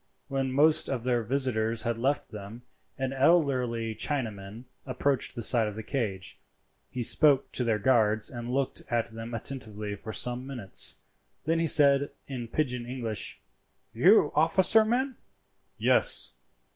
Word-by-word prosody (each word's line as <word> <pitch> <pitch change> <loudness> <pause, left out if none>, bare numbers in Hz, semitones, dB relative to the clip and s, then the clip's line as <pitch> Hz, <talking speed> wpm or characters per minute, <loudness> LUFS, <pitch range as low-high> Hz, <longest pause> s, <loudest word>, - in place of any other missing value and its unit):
When 135 -1 -2
most 150 +4 +3
of 130 -4 -3
their 120 -1 +1
visitors 115 -2 0
had 120 -1 -1
left 140 +4 -1
them, 105 +3 -9 0.3
an 135 0 -3
elderly 130 -6 +1
Chinaman 110 -4 -4 0.2
approached 130 +1 -1
the 120 - -4
side 115 -1 +3
of 105 - -6
the 110 - -6
cage. 105 -8 -4 0.5
He 125 - -4
spoke 140 +3 +4
to 125 - 0
their 115 -3 +1
guards 110 -2 +2
and 120 0 -6
looked 135 +1 -1
at 120 -1 -1
them 115 +1 -7
attentively 110 -4 -6
for 110 +2 -8
some 125 +3 -3
minutes, 120 -8 -2 0.5
then 165 +2 +1
he 165 - +1
said 140 -2 +5 0.2
in 125 -4 -6
pigeon 125 -2 -2
English, 115 -4 -4 0.5
"You 155 - +4
officer 185 +8 +4
men?" 250 +3 -1 0.6
"Yes!" - - +2
125 Hz, 145 wpm, -28 LUFS, 115-140 Hz, 0.6 s, said